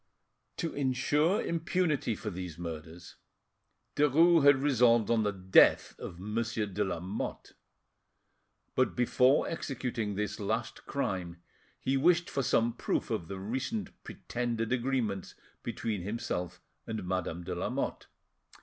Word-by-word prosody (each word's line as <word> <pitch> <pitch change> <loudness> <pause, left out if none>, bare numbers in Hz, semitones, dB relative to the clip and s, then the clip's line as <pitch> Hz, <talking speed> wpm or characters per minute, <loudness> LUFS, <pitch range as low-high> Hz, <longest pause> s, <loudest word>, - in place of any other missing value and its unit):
To 165 - -2
insure 145 +6 +1
impunity 165 -7 0
for 105 - -5
these 90 -3 -6
murders, 85 0 -8 0.8
Derues 160 +3 +5
had 145 0 +8
resolved 120 -5 +3
on 115 -1 +3
the 105 -1 +1
death 95 -1 +4
of 85 - -7
Monsieur 110 +2 -2
de 100 +1 -1
Lamotte; 95 +2 -4 1.2
but 130 - +1
before 125 +2 +3
executing 125 -9 -3
this 105 +2 -3
last 100 - -3
crime, 90 -10 -3 0.4
he 135 +1 0
wished 175 +6 +3
for 140 - 0
some 120 -3 +2
proof - - -2
of 80 - -2
the 95 - -5
recent 130 - -3
pretended 120 -1 -3
agreements 120 -6 -1 0.3
between 105 -5 -3
himself 90 -3 -4 0.2
and 110 -5 -4
Madame 90 -2 -2
de - - -4
Lamotte. - - -3
115 Hz, 120 wpm, -31 LUFS, 95-135 Hz, 1.2 s, had